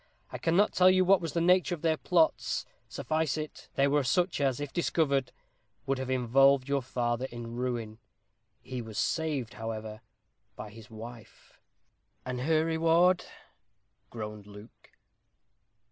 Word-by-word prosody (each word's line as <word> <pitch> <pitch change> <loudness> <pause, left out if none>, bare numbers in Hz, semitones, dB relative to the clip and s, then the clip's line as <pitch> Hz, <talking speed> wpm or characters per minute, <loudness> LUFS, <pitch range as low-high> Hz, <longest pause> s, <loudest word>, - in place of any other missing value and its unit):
I - - -6
cannot 175 +5 +2
tell 185 0 +6
you 185 0 +4
what 195 0 +5
was 165 -4 -4
the 170 - 0
nature 180 +1 +3
of 160 - -17
their 160 -1 +3
plots. 165 0 +1 0.2
Suffice 155 -1 -1
it, 155 -1 -7
they 140 0 +3
were 145 0 +2
such 175 +5 +1
as, 135 -2 +1
if 145 -2 -5
discovered, 140 -6 0 0.5
would 135 -1 -1
have 130 -1 -4
involved 130 +2 +3
your 140 0 0
father 120 0 -2
in 120 -2 -7
ruin. 120 -3 -3 0.6
He 130 -1 -5
was 110 -2 -9
saved, 145 -1 -1
however, 110 -1 -6 0.5
by 105 0 -8
his 115 +1 -13
wife." 115 +1 -12 0.7
"And 125 -1 -4
her 155 +3 +2
reward 165 +3 +3 0.4
" - - -47
groaned 105 -2 -7
Luke. 105 +2 -14
135 Hz, 145 wpm, -29 LUFS, 120-160 Hz, 0.7 s, tell